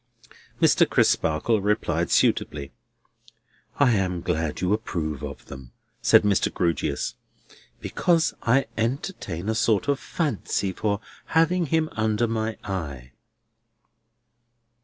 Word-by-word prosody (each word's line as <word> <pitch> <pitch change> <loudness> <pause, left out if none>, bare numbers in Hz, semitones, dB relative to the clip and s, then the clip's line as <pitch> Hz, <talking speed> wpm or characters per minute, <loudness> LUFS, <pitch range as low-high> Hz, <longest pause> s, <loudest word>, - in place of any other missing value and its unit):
Mr. - - +4
Crisparkle 85 +8 +2
replied 90 -5 0
suitably. 70 -2 +1 1.1
"I 140 -3 +5
am 90 -5 0
glad 80 -3 -2
you 90 +2 +1
approve 80 - -3
of - - -7
them," 65 -3 -11 0.3
said - - +6
Mr. 100 -2 +2
Grewgious, 85 -2 -1 0.7
"because 170 -2 +1
I 130 +3 +3
entertain 115 - -3
a 110 - +1
sort 110 -1 +1
of 140 -1 +1
fancy 120 - -2
for 100 +2 -1 0.4
having 170 +1 +3
him 160 +2 +1
under 110 +1 0
my 110 -1 -2
eye." 70 - -5
105 Hz, 110 wpm, -25 LUFS, 85-120 Hz, 1.1 s, said